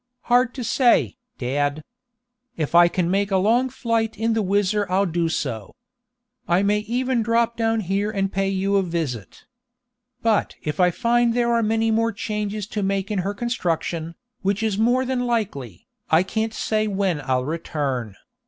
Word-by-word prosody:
"Hard 245 0 +2
to 255 - -4
say, 240 +2 +3 0.2
dad. 145 +4 -1 0.7
If 155 -1 -2
I 175 0 +7
can 175 0 -1
make 200 +1 +1
a 195 - +2
long 235 +7 +2
flight 230 -3 -1
in 225 +2 +1
the 220 - +1
WHIZZER 205 0 +1
I'll 190 +2 +2
do 170 -2 0
so. 115 -9 -4 0.7
I 175 +3 +3
may 205 +1 +2
even 245 +3 -1
drop 230 +1 +1
down 225 -1 +1
here 200 +2 -1
and 195 -2 -2
pay 195 0 0
you 195 +1 +1
a - - +4
visit. 160 - -4 0.8
But 225 -2 +1
if 150 +3 -4
I 180 -1 +5
find 235 +4 +1
there 235 -1 +2
are 230 - +3
many 225 +1 +1
more 230 +1 +2
changes 210 -1 -3
to 210 - -3
make 195 +1 -1
in 205 - 0
her 195 +3 -2
construction, 170 -7 -2 0.3
which 200 +2 0
is 220 -3 0
more 245 +5 +2
than 250 -1 -1
likely, 140 - -3 0.2
I 160 +3 +4
can't 220 +3 -2
say 215 0 0
when 190 -6 0
I'll 130 -2 0
return. 140 - -3
200 Hz, 170 wpm, -23 LUFS, 170-225 Hz, 0.8 s, I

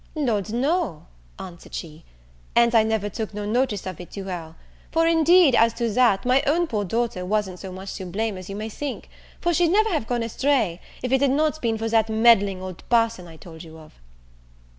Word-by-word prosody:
"Lord, 220 -9 -1
no," 255 - -1 0.3
answered 170 -2 -10
she, 160 0 -8 0.5
"and 235 0 +4
I 225 - +6
never 220 -1 -1
took 215 0 -5
no 210 0 -4
notice 225 -1 0
of 185 -3 -6
it 175 - -11
to 200 - -6
her: 170 -4 -7 0.4
for, 330 0 +2
indeed, 330 -2 +5
as 230 -1 +4
to 235 -2 -1
that, 230 -3 +3
my 255 +2 +4
own 340 +5 +2
poor 215 -10 -2
daughter 225 -1 -2
wasn't 190 -1 -2
so 190 - -8
much 190 +1 -7
to 190 - -6
blame 210 +3 -2
as 185 0 -9
you 195 - -5
may 215 +2 -4
think; 270 +5 -6 0.3
for 345 -1 0
she'd 345 +1 +3
never 430 +6 +3
have 300 -10 -1
gone 240 -1 -1
astray, 230 -7 0 0.2
if 250 - -2
it 265 0 +3
had 280 - +3
not 305 +3 0
been 225 -2 0
for 225 +1 -3
that 225 -1 +2
meddling 220 -4 +3
old 185 -2 -8
parson 230 -6 +1
I 165 -1 -13
told 160 0 -12
you 160 -1 -12
of." 155 -1 -15
220 Hz, 210 wpm, -23 LUFS, 190-260 Hz, 0.5 s, I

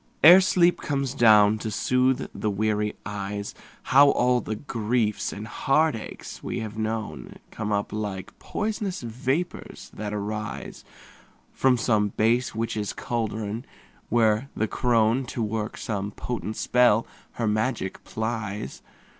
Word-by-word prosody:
Ere 175 +5 +10
sleep 175 -1 +3
comes 140 -3 -1
down 110 -4 +6
to 110 - -3
soothe 125 +4 +1
the 105 - -2
weary 105 +1 0
eyes, 100 0 -4 0.3
How 140 +2 +6
all 125 -2 +3
the 110 - -4
griefs 110 -2 -1
and 105 +1 -6
heartaches 135 0 -1
we 120 - -3
have 110 -1 -6
known 110 0 -4 0.2
Come 105 -1 -4
up 100 0 -1
like 105 -3 -4
pois'nous 210 - -3
vapors 130 +9 -3
that 105 0 -5
arise 105 +1 -5 0.7
From 130 -1 +3
some 110 -3 +2
base 115 +5 +1
witch's 110 -3 -2
caldron, 110 -1 -3 0.5
when 115 +2 +2
the 110 - 0
crone, 115 +2 +2
To 120 - -3
work 110 0 -3
some 100 -2 -3
potent 110 0 -5
spell, 120 -3 +3 0.3
her 115 - -2
magic 110 -1 -1
plies. 110 -2 -4
110 Hz, 130 wpm, -25 LUFS, 105-125 Hz, 0.7 s, Ere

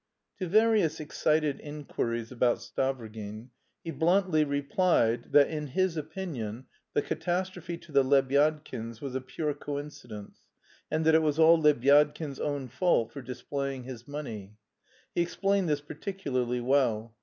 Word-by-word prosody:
To 185 - -2
various 215 -3 +3
excited 155 -1 0
inquiries 120 -6 -4
about 125 -1 +2
Stavrogin 110 -3 -4 0.3
he 165 - -4
bluntly 170 -1 +3
replied 140 -4 +1
that 145 -1 +6
in 150 -2 -4
his 185 +5 0
opinion 145 - -5 0.3
the 145 - +2
catastrophe 180 -1 -3
to 170 -1 -16
the 140 -1 +5
Lebyadkins 135 -3 +1
was 135 -1 -5
a 130 - -2
pure 150 +3 -3
coincidence, 145 -8 -7 0.5
and 155 +1 0
that 160 - +5
it 160 - +6
was 150 -1 +1
all 165 0 +6
Lebyadkin's 145 0 +3
own 145 -3 -2
fault 125 -3 +1
for 140 - -7
displaying 135 +1 -4
his 120 -2 -9
money. 110 -9 -7 0.6
He - - +1
explained 195 +1 +1
this 145 -1 +1
particularly 140 -7 -3
well. 120 -4 +1
145 Hz, 135 wpm, -29 LUFS, 125-160 Hz, 0.6 s, that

